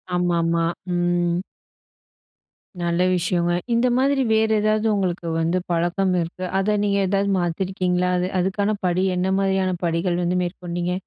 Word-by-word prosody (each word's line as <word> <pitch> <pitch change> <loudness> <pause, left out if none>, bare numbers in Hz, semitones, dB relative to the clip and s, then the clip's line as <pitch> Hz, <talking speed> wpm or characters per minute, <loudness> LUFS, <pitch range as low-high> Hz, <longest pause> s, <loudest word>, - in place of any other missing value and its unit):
ஆமா, 175 -1 +1
ஆமா. 165 0 +1 0.3
ம். 175 0 +1 1.4
நல்ல 170 0 0
விஷயங்க. 175 0 0 0.2
இந்த 235 +2 +3
மாதிரி 270 +1 +2
வேற 220 0 +3
ஏதாவது 215 +1 +1
உங்களுக்கு 180 -3 -2
வந்து 165 +2 +1
பழக்கம் 175 +3 +1
இருக்கு. 170 +2 -5
அத 210 +2 +1
நீங்க 200 -1 +1
ஏதாவது 200 +1 +1
மாத்தியிருக்கீங்களா? 180 +1 -1
அது 180 0 0
அதுக்கான 200 +3 0
படி 180 +1 +1
என்ன 180 +1 0
மாரியான 190 -1 +1
படிகள் 175 +1 0
வந்து 175 +1 0
மேற்கொண்டீங்க? 175 0 -3
180 Hz, 135 wpm, -22 LUFS, 175-195 Hz, 1.4 s, இந்த